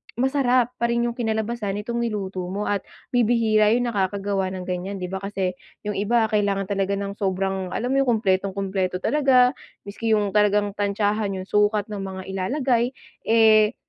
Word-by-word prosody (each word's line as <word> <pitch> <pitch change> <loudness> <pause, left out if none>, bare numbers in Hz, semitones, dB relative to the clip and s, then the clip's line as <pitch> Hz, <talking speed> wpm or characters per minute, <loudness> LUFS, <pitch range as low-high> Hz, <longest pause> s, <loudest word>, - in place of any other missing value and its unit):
masarap 255 -1 +2
pa 235 - +2
rin 235 0 +1
yung 240 - 0
kinalabasan 220 -3 -2
nitong 235 +3 -3
niluto 195 -5 -3
mo 200 +3 -3
at 205 - +1 0.3
bibihira 225 -3 +3
yung 245 0 0
nakagawa 195 -1 -1
ng 185 -1 -5
ganyan, 180 +2 -4
'di 180 -1 -5
ba? 190 - -3
Kasi 195 -1 -2 0.3
yung 210 - -2
iba 225 +4 +2
kailangan 200 -2 +1
talaga 195 0 0
ng 200 0 -5
sobrang 190 -1 -1
alam 245 +3 -2
mo 275 - +3
yun 275 - +1
kumpletong-kumpleto 190 -3 0
talaga, 265 -4 +4 0.3
miski 220 +2 0
yung 205 -2 0
talagang 210 0 +2
tantiyahan 205 0 -1
yung 185 - -4
sukat 210 0 +1
ng 205 - -4
mga 190 -1 -5
ilalagay, 245 +5 0 0.3
eh 220 0 +5
205 Hz, 165 wpm, -23 LUFS, 195-235 Hz, 0.3 s, eh